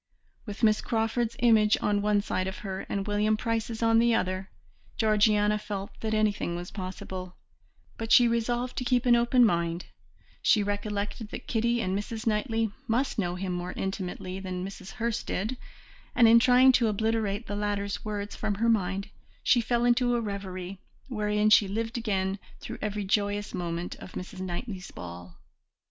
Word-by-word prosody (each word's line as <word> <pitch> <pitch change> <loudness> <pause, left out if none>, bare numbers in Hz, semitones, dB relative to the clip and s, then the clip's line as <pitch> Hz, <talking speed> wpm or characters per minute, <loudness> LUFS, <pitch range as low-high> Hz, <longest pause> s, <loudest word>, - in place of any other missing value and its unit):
With 205 +2 -7
Miss 215 -1 +4
Crawford's 225 0 0
image 220 -3 +5
on 205 -1 +1
one 205 0 +2
side 185 -2 -2
of 190 - -5
her, 190 -1 -4
and 195 -1 -2
William 210 +1 +1
Price's 230 0 -2
on 225 0 +5
the 235 0 +4
other, 185 -1 -1 0.5
Georgiana 210 -1 +3
felt 200 -2 -5
that 220 -1 -1
anything 210 -5 0
was 175 +1 -6
possible, 185 -1 -6 0.6
but 225 0 -4
she 245 - +8
resolved 240 +2 -1
to - - -3
keep 250 0 +1
an 240 -1 +6
open 240 +1 +4
mind; 170 -3 0 0.6
she 210 - +4
recollected 205 +2 -3
that - - -7
Kitty 235 +1 +1
and 190 -2 -1
Mrs. 220 +3 -4
Knightley 225 0 0 0.2
must 240 +2 0
know 175 -3 -1
him 180 0 -3
more 180 +1 -4
intimately 185 -1 -4
than 185 -1 -4
Mrs. 195 -1 -9
Hurst 235 -1 -2
did, 215 +7 -2 0.6
and 240 -2 +7
in 230 +1 +8
trying 255 +2 +6
to 240 -2 +3
obliterate 220 0 0
the 205 - -4
latter's 205 -1 -2
words 205 -1 -4
from 215 -2 -2
her 230 +3 +1
mind 195 -2 0 0.3
she 245 - +4
fell 240 +1 +1
into 245 0 +3
a - - +1
reverie, 195 -3 -5 0.3
wherein 210 -2 +1
she 210 -1 +7
lived 225 +4 -3
again 195 -4 -1 0.2
through - - -7
every 210 -1 -2
joyous 205 +1 0
moment 175 -1 -3
of - - -11
Mrs. 185 +1 -7
Knightley's 185 +1 -5
ball. 90 0 -9
210 Hz, 170 wpm, -28 LUFS, 190-230 Hz, 0.6 s, she